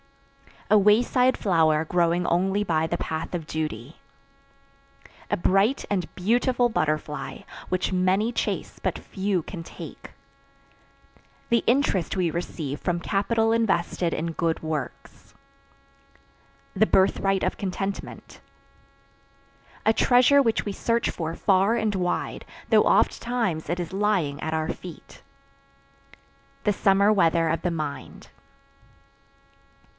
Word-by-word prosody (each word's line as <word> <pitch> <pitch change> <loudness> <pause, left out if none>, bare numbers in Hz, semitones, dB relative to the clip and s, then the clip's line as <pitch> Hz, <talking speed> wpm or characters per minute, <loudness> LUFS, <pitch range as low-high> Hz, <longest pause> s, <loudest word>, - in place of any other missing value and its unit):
A 215 - +7
wayside 245 +5 +3
flower 160 -6 +2
growing 175 +1 +1
only 190 +4 +1
by 160 -4 0
the - - -2
path 160 +2 -4
of 165 -3 -4
duty. 150 -4 -5 1.3
A - - +2
bright 195 +9 +2
and 180 -5 0
beautiful 240 +5 +1
butterfly, 155 -6 -2 0.3
which 185 +1 -1
many 185 +5 +1
chase - - -3
but - - -1
few 190 -3 -2
can 170 -1 -8
take. - - -10 1.4
The 235 0 +2
interest 235 - +1
we 180 -3 0
receive 155 -4 -4
from 175 -1 -2
capital 225 +4 +1
invested 185 -6 0
in 165 +1 -2
good 165 0 -2
works. 155 -2 -6 1.4
The 215 +3 +3
birthright 195 0 +2
of - - -1
contentment. 195 0 -5 1.5
A 220 - +5
treasure 255 +4 +5
which 230 -4 +1
we 205 - -2
search 230 +4 0
for 165 -1 -4
far 195 +4 +2
and 220 -2 0
wide, 180 -2 -2 0.2
though - - +5
oft - - +2
times 225 -11 -2
it 175 +1 -1
is 175 0 -5
lying 190 -8 0
at 160 - -3
our 160 +1 -1
feet. 175 -4 -9 1.4
The 210 - +2
summer 200 +1 +3
weather 165 -4 +2
of 165 - -1
the 180 - -1
mind. 155 -3 -6
185 Hz, 120 wpm, -25 LUFS, 165-210 Hz, 1.5 s, A